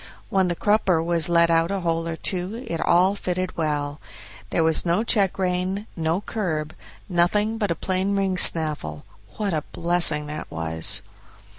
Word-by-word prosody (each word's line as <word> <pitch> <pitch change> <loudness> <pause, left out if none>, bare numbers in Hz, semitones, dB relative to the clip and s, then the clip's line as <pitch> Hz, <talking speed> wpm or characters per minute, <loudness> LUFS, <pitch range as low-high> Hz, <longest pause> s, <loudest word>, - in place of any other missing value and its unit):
When 190 -1 +2
the 175 - -1
crupper 190 -4 +2
was 170 0 0
let 170 -1 +4
out 165 +1 +2
a 195 -1 -2
hole 165 -1 -1
or 165 - -3
two 190 +9 -4
it 165 - -3
all 180 +3 +4
fitted 185 -2 -3
well. 145 -2 -2 0.5
There 165 - +1
was 160 -1 +1
no 175 +5 +1
check 200 -5 +3
rein, 185 +2 -1
no 165 +3 -1
curb, 160 -9 -3 0.3
nothing 205 +5 +1
but 205 -3 0
a 170 - 0
plain 190 +4 -1
ring 195 -1 0
snaffle. 150 - +2 0.3
What 205 -4 -1
a 155 -2 -1
blessing 170 -3 +2
that 150 +1 -7
was! 80 0 +1
175 Hz, 165 wpm, -23 LUFS, 160-195 Hz, 0.5 s, let